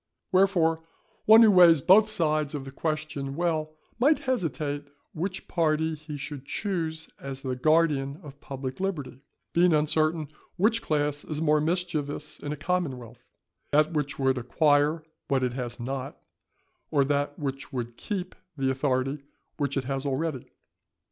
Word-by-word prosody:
Wherefore 180 -4 +3 0.4
one 220 +2 +9
who 220 - +7
weighs 170 -6 +7
both 210 +4 +6
sides 155 -6 0
of 135 -2 -5
the 135 - -8
question 150 -2 -3
well, 155 -2 -1 0.2
might 290 +5 +5
hesitate 150 - -2 0.3
which 185 +4 -4
party 160 -2 +1
he 155 -1 -7
should 140 -1 -7
choose 160 -2 -3
as 135 -1 -7
the 130 -2 -2
guardian 150 -1 +2
of 145 -1 -12
public 135 0 -6
liberty, 155 -9 -3 0.3
being 175 0 +4
uncertain 155 0 +1 0.3
which 225 +5 +3
class 145 -1 -1
is 150 -1 -4
more 155 -1 +3
mischievous 155 -3 -2
in 145 - -5
a 150 - -4
commonwealth, 130 -10 -3 0.5
that 155 +3 +3
which 145 -2 -2
would 135 -1 +1
acquire 145 +5 +2 0.2
what 135 -2 +1
it 125 -1 0
has 120 -1 -5
not, 135 +4 -4 0.7
or 140 -3 +3
that 145 0 -1
which 135 -2 -5
would 120 -2 -4
keep 185 - -4 0.2
the 135 -1 +1
authority 135 +1 -1 0.4
which 140 -2 -1
it 135 - 0
has 135 +1 -3
already. 140 0 -2
150 Hz, 150 wpm, -27 LUFS, 135-165 Hz, 0.7 s, one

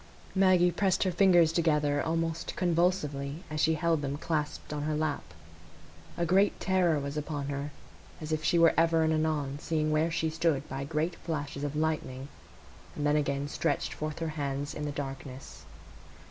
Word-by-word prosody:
Maggie 185 -2 +4
pressed 190 0 +1
her 185 - +1
fingers 175 -3 +5
together 150 -3 +2
almost 165 0 -2
convulsively 165 -4 0
as 155 - -3
she 160 0 +3
held 165 -1 +1
them 140 0 -3
clasped 150 -1 -3
on 150 - -3
her 155 +1 -1
lap. 155 -1 -1 0.9
A 170 - +1
great 195 +4 +3
terror 180 -5 +2
was 140 +1 -4
upon 145 -2 -3
her, 140 +1 -3 0.5
as 155 0 -6
if 155 0 -1
she 170 - +3
were 165 -1 +6
ever 165 0 +3
and 160 0 +2
anon 150 -3 -1
seeing 155 -1 0
where 155 +2 +2
she 160 -1 -1
stood 155 -3 0
by 135 +1 -4
great 160 +3 -1
flashes 145 -3 -4
of 145 0 -3
lightning, 150 -4 -2 0.7
and 145 - -2
then 145 0 +3
again 140 -1 0
stretched 145 0 -1
forth 155 0 -4
her 165 -1 -2
hands 145 -1 -3
in 150 - -4
the 145 - -2
darkness. 135 -2 -7
155 Hz, 175 wpm, -30 LUFS, 145-165 Hz, 0.9 s, were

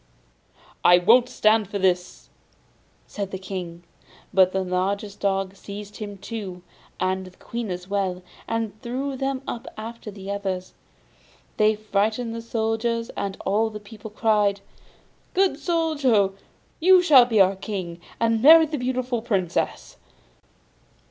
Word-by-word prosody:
'I 175 - +7
won't 235 +7 +5
stand 215 -2 +3
this!' 180 -2 -1 0.7
said 200 -2 -5
the 190 - -5
King; 180 -3 -7 0.5
but 185 -1 +5
the 190 0 -1
largest 195 +3 -2
dog 195 -1 -1
seized 205 +1 -9
him 205 -2 -7
too, 195 -3 -7 0.4
and 185 0 -1
the 185 - -16
Queen 235 -2 -5
as 180 0 -5
well, 190 -2 -2 0.2
and 225 -2 -3
threw 265 +3 -3
them 270 0 -2
up 235 - -5
after 225 0 -7
the 200 -1 -7
others. 190 -2 -4 0.8
This 215 0 +3
frightened 215 +3 -1
the 230 - -5
soldiers, 230 0 -1
and 195 -1 -4
all 215 +3 +2
the 215 -1 -8
people 210 +1 -11
cried: 210 -2 +1 0.7
'Good 370 -6 +2
Soldier, 285 - +2 0.5
you 365 +2 +6
shall 275 -8 +7
be 225 -3 +1
our 195 0 +5
King, 185 -4 -6 0.2
and 225 -1 +2
marry 320 +4 +9
the 300 -2 -4
beautiful 250 -1 -1
Princess! 195 -7 -2
210 Hz, 135 wpm, -24 LUFS, 190-235 Hz, 0.8 s, marry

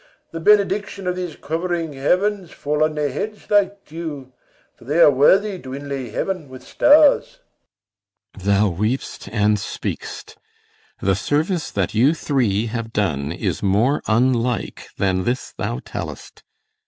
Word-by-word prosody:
The 165 - -5
benediction 200 +1 +2
of 180 0 0
these 180 -4 -5
covering 165 0 -3
heavens 185 +7 0
Fall 150 +1 -1
on 155 0 0
their 150 -2 -1
heads 210 +11 -6
like 200 -1 +2
dew! 150 -5 -7 0.4
for - - -19
they 145 +7 -1
are 160 - +8
worthy 190 +9 +3
To 130 -3 -7
inlay 140 -3 -5
heaven 170 - -3
with 130 0 -11
stars. 300 - +4 1.0
CYMBELINE. 95 - -8
Thou 105 +1 +3
weep'st 105 +4 -3
and 105 -1 +2
speak'st. - - -6 0.6
The 95 - +2
service 155 - -1
that 95 -3 -2
you 130 +9 +4
three 120 -9 0
have 115 0 -4
done 75 -10 -1
is 85 - -2
more 105 +8 +2
Unlike 120 +1 0
than 95 -1 +1
this 125 +6 -2
thou - - -3
tell'st. - - -7
145 Hz, 140 wpm, -21 LUFS, 115-180 Hz, 1.0 s, are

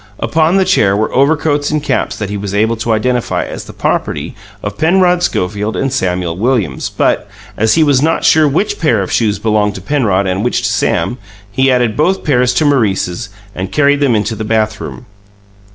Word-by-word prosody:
Upon 165 +3 +1
the 190 - +3
chair 105 - +2
were 110 - -1
overcoats 145 +1 +1
and 155 -1 -1
caps - - -1
that 105 -2 -4
he - - -3
was 100 0 -4
able 110 +3 +2
to 115 +1 -2
identify 120 +2 0
as - - -7
the - - -10
property - - -2 0.3
of - - -4
Penrod 180 +2 +3
Schofield 105 - -2
and 135 -1 -1
Samuel 90 -7 -1
Williams; 105 - -1
but, - - 0 0.3
as 110 +1 +2
he 160 - +4
was 140 -3 +3
not 160 +2 +1
sure 155 -1 +5
which 160 +9 -1
pair 120 - +2
of 95 - -6
shoes 110 -3 +1
belonged 105 -2 0
to 95 - -7
Penrod 100 -5 0
and 95 +2 -1
which 125 - 0
to - - +1
Sam, 125 - -1 0.3
he 130 +5 +2
added 120 -3 +1
both 185 +6 +1
pairs 125 -4 +2
to 155 - +2
Maurice's 110 -6 0 0.2
and 95 0 -5
carried 145 -1 +2
them 135 -5 +2
into 110 +1 -1
the 110 - -5
bathroom. 110 +2 -2
120 Hz, 195 wpm, -14 LUFS, 105-145 Hz, 0.3 s, sure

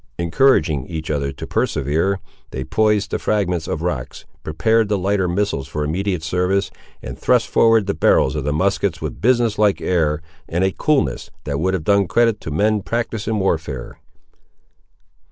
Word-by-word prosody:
Encouraging 85 - +2
each 80 -2 -4
other 70 -2 -1
to 70 - -8
persevere, 80 +7 0 0.3
they 65 - -5
poised 105 +6 +1
the - - -1
fragments 90 -6 -1
of 80 - -3
rocks, 65 -8 -4 0.2
prepared 110 +7 +1
the 105 - +1
lighter 95 0 0
missiles 90 -6 -1
for 75 +1 -3
immediate 90 +2 -2
service, 90 +4 0 0.3
and - - -7
thrust - - +3
forward 115 -2 +4
the 100 - -1
barrels 80 - +3
of 75 - -2
the 75 - -1
muskets 95 +1 0
with 75 - -4
a - - -16
business 120 -3 +2
like 105 -2 +3
air, 80 -3 0 0.3
and 85 +3 0
a 95 - +2
coolness, 150 +7 0
that 70 0 -3
would 95 +3 +1
have 85 - -4
done 100 +1 +3
credit 115 +2 +2
to - - -6
men 105 +7 +1
practised 115 0 -3
in 110 -1 0
warfare. 80 -9 -2
95 Hz, 170 wpm, -20 LUFS, 80-105 Hz, 0.3 s, forward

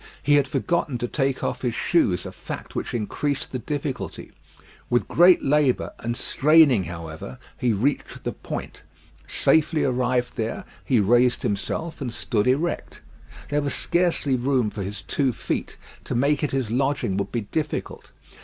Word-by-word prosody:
He 145 - +3
had 145 -2 +4
forgotten 150 -1 0
to 120 - -2
take 135 0 -1
off - - -2
his 120 -3 -1
shoes, 100 - +2
a - - -5
fact - - -8
which - - -3
increased 135 +6 -2
the 130 - -3
difficulty. 130 - -4 0.6
With 120 0 +1
great 175 +1 +6
labour 140 -2 +2
and 120 +1 -3
straining, 140 - +4
however, 85 +6 -7 0.2
he 125 -2 +1
reached 125 +8 -1
the - - -2
point. - - -7 0.5
Safely 155 0 +2
arrived 125 -1 0
there, 115 -1 -3 0.2
he 125 -4 +2
raised 120 +4 +3
himself 155 +11 -2
and 125 -3 -3
stood 110 -2 -1
erect. 150 +7 -1 0.5
There 145 0 +2
was 140 -1 0
scarcely 170 -6 +1
room 125 -3 +1
for 105 - -5
his 100 +1 -5
two 135 -3 +1
feet. - - -4 0.3
To - - -3
make 140 +5 +2
it 150 - +1
his 130 -5 -2
lodging 135 -5 0
would 100 0 -2
be 120 - -1
difficult. 150 +9 -4
130 Hz, 160 wpm, -24 LUFS, 115-145 Hz, 0.6 s, great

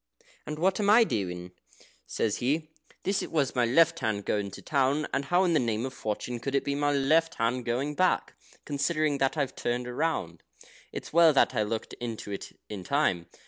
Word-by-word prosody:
"And 150 - -4
what 185 +5 +1
am 205 -1 +2
I 225 +3 +8
doing?" 90 - -3 0.3
he - - -23 0.2
says. 110 +1 -1 0.6
"This 195 +1 0
was 145 -5 0
my 125 -2 +2
left 165 +6 +4
hand 110 -4 -2
going 100 -1 -1
to 95 - -10
town, 140 +1 +1
and 140 - 0
how 180 +1 +3
in 175 -2 +2
the 155 - +4
name 115 -1 -1
of 130 - -5
fortune 120 +1 -4
could 140 +3 -3
it 140 - +2
be 140 - -1
my 145 +1 +1
left 155 +4 +2
going 125 +4 -1
back, 185 +4 +1 0.3
considering 150 0 0
that 135 +3 +1
I've 140 -3 -1
turned 120 +1 -2
round? 120 - -2 0.5
It's - - -7
well 165 -1 +7
that 135 - +4
I 115 - +1
looked 110 +1 -3
into 115 -3 -5
it 100 - -7
in 100 -3 -6
time." 95 - +1
135 Hz, 190 wpm, -28 LUFS, 115-155 Hz, 0.6 s, I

